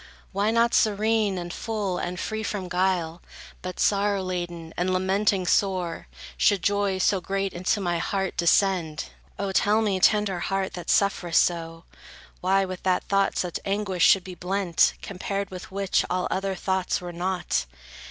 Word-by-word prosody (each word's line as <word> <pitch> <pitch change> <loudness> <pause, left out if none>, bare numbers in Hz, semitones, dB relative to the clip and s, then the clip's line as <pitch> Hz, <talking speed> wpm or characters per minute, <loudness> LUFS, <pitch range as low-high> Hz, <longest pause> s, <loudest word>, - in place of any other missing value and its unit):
Why 200 +2 +1
not 230 +1 +3
serene, 215 -1 +2
and 175 0 -5
full, 205 -5 -2
and 180 0 -4
free 220 +2 -3
from 205 -3 -3
guile 180 -2 0 0.4
But 185 0 -6
sorrow 200 -1 +2
laden, 175 -3 -5
and 180 +1 0
lamenting 190 +1 +1
sore, 180 - 0 0.3
Should 190 - +3
joy 200 -1 +1
so 190 0 +2
great 195 +1 -2
into 185 +4 0
my 175 -3 -1
heart 195 +2 -2
descend? 170 -2 +1 0.3
O 200 -1 -2
tell 205 +3 +3
me, 195 -3 0
tender 200 -1 +3
heart, 195 +1 -2
that 175 - -7
sufferest 185 -4 +3
so, 165 -1 -4 0.6
Why 195 +1 +2
with 185 -1 -6
that 185 -1 +1
thought 195 -1 +1
such 180 -2 -2
anguish 195 -3 -1
should 195 -2 +6
be 185 - -8
blent, 180 0 +1
Compared 200 +1 -4
with 185 -1 -8
which, 195 0 +1
all 180 0 0
other 195 0 -1
thoughts 190 0 -1
were 175 -1 -7
naught? 180 - -1
190 Hz, 160 wpm, -25 LUFS, 180-200 Hz, 0.6 s, should